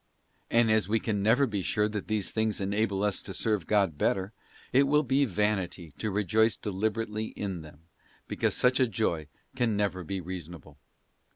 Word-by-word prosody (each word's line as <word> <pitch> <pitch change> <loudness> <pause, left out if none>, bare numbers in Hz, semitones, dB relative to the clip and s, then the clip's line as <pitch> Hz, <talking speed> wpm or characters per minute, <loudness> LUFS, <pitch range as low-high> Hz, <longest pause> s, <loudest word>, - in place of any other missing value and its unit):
And 115 -1 +4
as 110 -3 +2
we 110 +1 +2
can 105 -3 -1
never 115 +7 +4
be 105 -6 -2
sure 105 +3 +1
that 105 -1 -5
these 110 -2 -1
things 110 -1 0
enable 100 0 0
us 105 -2 0
to 95 - -8
serve 105 -5 0
God 100 -8 +2
better, 95 +2 0 0.4
it 135 +2 +5
will 150 +2 +3
be 135 +2 +2
vanity 95 - -1
to 110 - -1
rejoice 105 +2 +2
deliberately 110 +2 -2
in 95 -5 -5
them, 75 -1 -14 0.5
because - - 0
such 125 +1 +3
a 130 - +4
joy 90 -8 -1 0.3
can 120 -5 +1
never 100 -3 0
be 95 +4 -3
reasonable. 85 -4 -8
105 Hz, 175 wpm, -29 LUFS, 95-110 Hz, 0.5 s, it